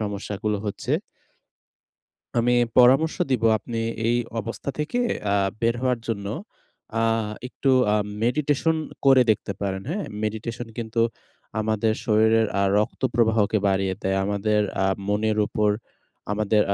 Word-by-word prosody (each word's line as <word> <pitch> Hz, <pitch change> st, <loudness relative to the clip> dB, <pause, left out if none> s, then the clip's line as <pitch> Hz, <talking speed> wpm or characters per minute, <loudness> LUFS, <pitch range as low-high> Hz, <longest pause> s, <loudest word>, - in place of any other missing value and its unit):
সমস্যাগুলো 105 Hz, 0 st, -3 dB
হচ্ছে। 100 Hz, -, -3 dB, 1.5 s
আমি 120 Hz, +1 st, +3 dB, 0.3 s
পরামর্শ 135 Hz, +6 st, +5 dB
দিব, 125 Hz, -3 st, +1 dB, 0.2 s
আপনি 115 Hz, 0 st, -5 dB, 0.3 s
এই 120 Hz, +1 st, +3 dB, 0.2 s
অবস্থা 115 Hz, +5 st, -5 dB
থেকে 155 Hz, +11 st, -1 dB, 0.3 s
আহ 100 Hz, -1 st, +2 dB
বের 115 Hz, 0 st, +2 dB
হওয়ার 125 Hz, -2 st, +1 dB
জন্য 100 Hz, -3 st, -2 dB, 0.7 s
আহ 115 Hz, -1 st, +1 dB, 0.2 s
একটু 135 Hz, -, 0 dB, 0.2 s
আ -, -, +3 dB, 0.3 s
মেডিটেশন 150 Hz, +5 st, +1 dB, 0.3 s
করে 135 Hz, -2 st, +7 dB
দেখতে 100 Hz, -1 st, 0 dB
পারেন। 95 Hz, -1 st, -2 dB
হ্যাঁ? 200 Hz, +3 st, -2 dB, 0.2 s
মেডিটেশন 115 Hz, +2 st, -4 dB
কিন্তু 115 Hz, 0 st, -2 dB, 0.6 s
আমাদের 110 Hz, 0 st, +1 dB
শরীরের 110 Hz, 0 st, +4 dB
আ -, -, +3 dB, 0.2 s
রক্তপ্রবাহকে 110 Hz, -2 st, +1 dB
বাড়িয়ে 95 Hz, -1 st, +1 dB
দেয়। 95 Hz, 0 st, 0 dB
আমাদের 105 Hz, +1 st, +1 dB, 0.2 s
আ -, -, +2 dB, 0.2 s
মনের 105 Hz, +1 st, +1 dB
উপর, 105 Hz, 0 st, +1 dB, 0.6 s
আমাদের 105 Hz, 0 st, +2 dB
110 Hz, 120 wpm, -24 LUFS, 105-120 Hz, 1.5 s, করে